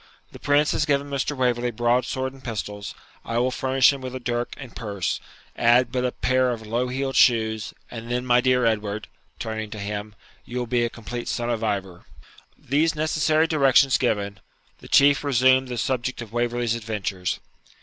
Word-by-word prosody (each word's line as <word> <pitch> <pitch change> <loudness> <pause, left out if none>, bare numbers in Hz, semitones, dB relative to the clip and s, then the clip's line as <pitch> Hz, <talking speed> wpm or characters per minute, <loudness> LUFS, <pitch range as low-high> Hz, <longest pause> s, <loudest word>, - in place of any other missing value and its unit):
The - - -12
Prince 145 +1 +3
has 150 - +1
given 140 0 0
Mr. 140 +1 -2
Waverley 125 -1 +1
broadsword 125 +3 0
and 135 -1 -16
pistols, 105 -3 -5 0.3
I 115 - -3
will 125 +2 +2
furnish 130 +1 +3
him 140 - -7
with 130 0 -6
a - - -4
dirk 120 0 -3
and 130 -4 -10
purse; 100 -6 -3 0.4
add 120 +1 +4
but 125 0 -1
a 125 - 0
pair 130 +1 +1
of 115 -2 -4
low 120 +4 -1
heeled 135 +1 -3
shoes, 110 -3 +3 0.2
and 115 0 -7
then, 125 +1 -1
my 125 0 +4
dear 125 -1 +3
Edward 105 -1 -1 0.3
(turning 110 -1 -4
to 105 - -7
him), 105 +1 -5 0.3
you 120 - -7
will 125 - -1
be 120 0 +1
a 120 - 0
complete 120 +1 -7
son 120 0 -1
of 115 -1 -2
Ivor.' 95 -5 -3 0.5
These 155 +5 +1
necessary 155 +1 +2
directions 140 -4 +4
given, 100 -5 -1 0.4
the - - -13
Chieftain 145 +1 +4
resumed 130 0 +4
the 125 -1 -5
subject 130 +1 -1
of 110 -1 -14
Waverley's 120 -1 0
adventures. 105 -5 -3
120 Hz, 180 wpm, -24 LUFS, 110-130 Hz, 0.5 s, add